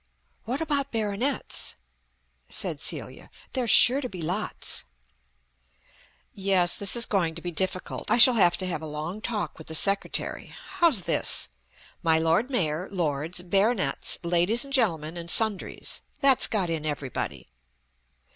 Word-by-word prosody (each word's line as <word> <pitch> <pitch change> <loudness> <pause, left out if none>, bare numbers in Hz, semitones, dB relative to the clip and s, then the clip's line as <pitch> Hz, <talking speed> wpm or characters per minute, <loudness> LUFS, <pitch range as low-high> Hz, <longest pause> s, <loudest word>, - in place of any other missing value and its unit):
"What 255 +6 -3
about 285 -3 -1
Baronets?" 225 +5 -2 0.7
said - - -2
Celia. - - -3 0.2
"There's 250 -3 -2
sure 260 +5 +8
to 250 - -5
be 180 -5 -7
lots." 185 +7 -2 1.5
"Yes, 190 -3 +3
this 200 +1 +1
is 235 -1 +3
going 170 -5 -1
to 170 - -6
be 175 - -4
difficult. 185 +2 -3
I - - +3
shall 245 +2 +7
have 185 -7 +4
to 185 - -4
have 170 -4 -4
a 160 - -7
long 155 +7 -6
talk 215 -7 -4
with 160 - -12
the 160 - -2
Secretary... 195 +4 +1 0.2
How's 320 - +3
this? - - +1 0.5
'My 160 -2 +2
Lord 165 +10 +1
Mayor, 175 - -1
Lords, 165 -1 -2
Baronets, 195 +4 0
Ladies 175 +7 +1
and 275 - -11
Gentlemen 170 - 0
and 170 0 -8
Sundries.' 215 0 0 0.2
That's 275 -3 +4
got 190 -6 -1
in 160 -2 -3
everybody." 145 -4 -5
190 Hz, 145 wpm, -25 LUFS, 165-230 Hz, 1.5 s, sure